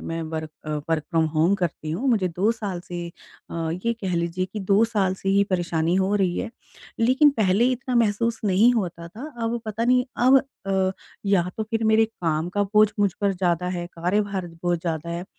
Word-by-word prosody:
मैं 165 0 -4
work 155 -1 -4 0.4
work 160 -2 +1
from 165 -1 +2
home 165 +6 +3
करती 170 -4 -3
हूँ। 235 +12 -1
मुझे 205 -7 +2
2 185 +6 +1
साल 200 -6 -5
से 175 -1 -6 0.4
अ, - - -7 0.3
ये 235 - +2
कह 185 -3 -2
लीजिए 170 +2 -1
कि 215 - -4
2 210 +3 +6
साल 200 -5 0
से 195 - -5
ही 200 +1 +4
परेशानी 170 -2 0
हो 195 +2 +1
रही 185 -3 +1
है। - - -3 0.5
लेकिन 260 +6 +5
पहले 200 +4 +3
इतना 255 0 -3
महसूस 230 0 +1
नहीं 210 +5 +5
होता 170 -5 -3
था। 225 - -9 0.2
अब 235 +1 -1
पता 215 +2 -2
नहीं 250 0 +3 0.2
अब 270 +1 +8 0.3
अ, 190 -1 +1 0.3
या 180 -3 +2
तो 220 - -1
फिर 225 +1 -2
मेरे 220 0 +5 0.2
काम 160 0 0
का 205 - +3
बोझ 215 0 +7
मुझ 200 -3 +3
पर 200 -1 +2
ज़्यादा 180 -1 0
है, 175 - -4
कार्यभार 185 +2 -1 0.2
बहुत 175 -1 0
ज़्यादा 165 -1 -3
है 170 +2 -4
190 Hz, 200 wpm, -24 LUFS, 175-220 Hz, 0.5 s, अब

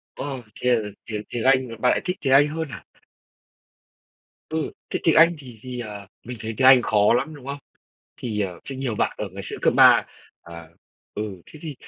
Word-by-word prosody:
Ồ, 135 -3 -5 0.2
thế 125 -1 +3
là 110 -3 -3 0.2
tiếng 105 -2 -4
tiếng 120 - -3
Anh, 130 -1 +4
bạn 125 - +4
lại - - 0
thích 180 +1 -2
tiếng 135 -2 +2
Anh 145 +2 +6
hơn 160 0 -4
hả? - - -9 1.7
Ừ, 160 -1 -2 0.2
thế - - -2
tiếng 165 - +4
Anh 165 +2 +6
thì 125 -5 -12
thì, 125 -1 -6
ờ, 105 -4 -7 0.2
mình 125 +1 -7
thấy 115 0 -4
tiếng 130 - +5
Anh 130 -1 +8
khó 105 -2 +3
lắm, 135 +6 -1
đúng 140 -3 -13
không? 140 +1 -4 0.6
Thì, 110 -4 -4
ờ, 90 -4 -3
sẽ 135 - -7
nhiều 130 -4 -2
bạn - - 0
ở 105 - -3
ngày 100 +1 -7
xưa - - -6
cấp - - +3
3 - - +7 0.4
à, 85 -1 -11 0.5
ừ, 105 -3 -5
thế 155 - -13
thì 155 -3 -6
125 Hz, 210 wpm, -23 LUFS, 105-140 Hz, 1.7 s, Anh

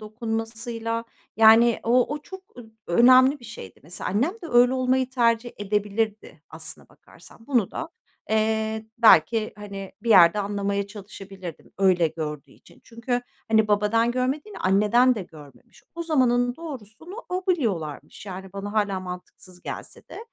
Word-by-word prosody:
dokunmasıyla. 225 +1 -4 0.3
Yani, 225 +1 +6
o 250 +4 +2
o - - -5
çok 380 +4 -10 0.2
ö 245 - -9 0.2
önemli 255 +8 +5
bir - - -15
şeydi. 215 - -11
Mesela, 170 +3 -6
annem 255 - +1
de - - -6
öyle 245 +1 +5
olmayı 260 0 0
tercih 235 -2 +1
edebilirdi, 210 +1 -3
aslına - - -10
bakarsan. 225 - -19
Bunu 245 -9 +1
da, - - -5 0.4
eee, 220 0 0
belki, 225 -1 +4
hani, 200 -2 -8
bir 235 - -5
yerde 180 0 +7
anlamaya 200 0 -2
çalışabilirdim, 195 -4 -10
öyle 180 -4 +3
gördüğü 150 -3 -6
için. - - -21
Çünkü, 245 +1 -3 0.3
hani, 220 -1 +3
babadan 210 +3 +2
görmediğini, 265 - -3
anneden 210 +7 +3
de 205 - -5
görmemiş. 150 -5 -17
O 340 - -4
zamanın 245 -6 +1
doğrusunu 305 - -10
o 365 +1 -3
biliyorlarmış, 205 - -2
yani, 190 0 -8
bana 200 +1 -6
hâlâ 205 -3 0
mantıksız 180 0 -11
gelse - - -9
de. - - -10
220 Hz, 140 wpm, -24 LUFS, 195-245 Hz, 0.4 s, yerde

